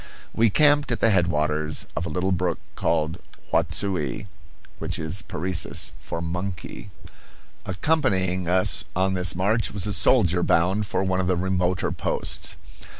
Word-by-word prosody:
We 115 0 +3
camped 145 +3 +4
at 115 - -1
the 115 - +3
headwaters 80 -4 0
of 85 - -2
a - - -4
little 90 +4 -1
brook 90 -1 0 0.2
called 80 0 -1 0.3
Huatsui, 85 -2 0 0.5
which - - -3
is 80 +5 -2
Parecis 85 0 0
for 85 - -5
"monkey." 90 +2 -5 0.8
Accompanying 95 - 0
us 90 +1 +2
on 95 +1 +1
this 90 -2 +2
march 105 +5 0
was 100 -3 0
a 105 - -1
soldier 90 -7 +4
bound 95 +5 +1
for - - -1
one 95 -1 0
of 95 - 0
the 90 - +2
remoter 90 -1 0
posts. - - -1
90 Hz, 145 wpm, -24 LUFS, 85-100 Hz, 0.8 s, camped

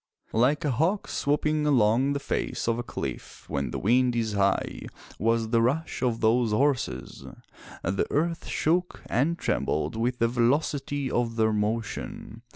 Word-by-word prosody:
Like 130 +7 +2
a 145 - +2
hawk 165 - 0
swooping 150 +1 0
along 130 +1 +3
the 140 - -1
face 140 - -2
of 115 0 +1
a - - -2
cliff - - -6
when 70 -2 -2
the - - -4
wind 125 +3 +2
is 110 -2 -1
high 100 -1 0 0.3
was 115 +1 +1
the 115 0 +3
rush 140 +8 0
of 120 -3 0
those 115 +1 +3
horses. 125 - 0 0.6
The 95 +3 0
earth 165 +3 -1
shook 175 +3 0
and 155 +8 +1
trembled 80 - -1
with 120 +2 0
the 115 - +3
velocity 135 +3 0
of 120 -1 0
their 110 -1 +2
motion. 110 +1 -3
120 Hz, 155 wpm, -27 LUFS, 110-145 Hz, 0.6 s, along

